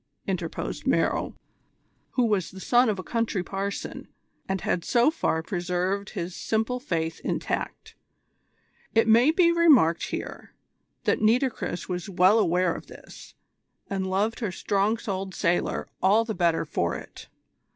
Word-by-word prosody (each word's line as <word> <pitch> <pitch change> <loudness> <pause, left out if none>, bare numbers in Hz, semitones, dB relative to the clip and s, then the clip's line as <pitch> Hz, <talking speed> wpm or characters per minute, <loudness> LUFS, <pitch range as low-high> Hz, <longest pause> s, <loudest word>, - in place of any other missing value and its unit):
interposed - - -4
Merrill, - - +1 0.8
who 250 - +2
was 205 -6 0
the 190 - -11
son 245 +4 +3
of 210 - 0
a 185 - -5
country 230 -5 -1
parson 195 +2 -5 0.4
and 190 -1 -1
had 175 - -1
so 240 - +3
far 160 - -1
preserved 180 +3 -2
his 175 0 -4
simple 225 +3 -1
faith 165 - -2
intact. - - -3 1.0
It 225 0 +4
may 235 +5 +6
be 340 +1 +4
remarked 290 - +4
here, - - -7 0.5
that - - +1
Nitocris 230 -4 +1
was 180 +1 -4
well 190 +4 +4
aware 180 -3 +2
of - - -9
this, - - -13 0.6
and 190 -1 -1
loved 205 +5 0
her 220 -6 -2
strong 200 +4 0
souled 195 -3 -4
sailor 175 0 0
all 210 +4 +4
the 225 - -3
better 170 -3 +1
for 85 - -1
it. - - -10
195 Hz, 140 wpm, -26 LUFS, 180-230 Hz, 1.0 s, may